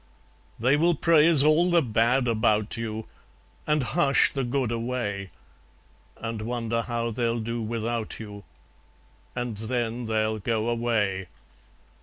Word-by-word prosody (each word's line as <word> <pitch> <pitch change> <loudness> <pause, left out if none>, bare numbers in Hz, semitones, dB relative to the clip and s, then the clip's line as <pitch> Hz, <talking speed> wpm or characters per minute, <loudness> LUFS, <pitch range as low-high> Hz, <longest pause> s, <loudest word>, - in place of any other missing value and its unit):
They 130 +5 +3
will 170 +2 +3
praise 160 -1 +5
all 155 +4 +4
the 170 -2 +4
bad 120 +2 +2
about 110 -2 +1
you, 110 -1 -4 0.6
And 150 -2 +2
hush 140 +1 +3
the 135 - -2
good 125 -1 -1
away, 115 -5 -3 0.9
And 115 -1 -5
wonder 115 0 -2
how 115 0 -2
they'll 115 0 -1
do 115 +1 -3
without 115 0 -3
you, 105 -2 -9 0.9
And 120 -2 -3
then 115 +1 -2
they'll 110 0 0
go 110 +2 -1
away. 105 -6 0
115 Hz, 125 wpm, -26 LUFS, 110-125 Hz, 0.9 s, praise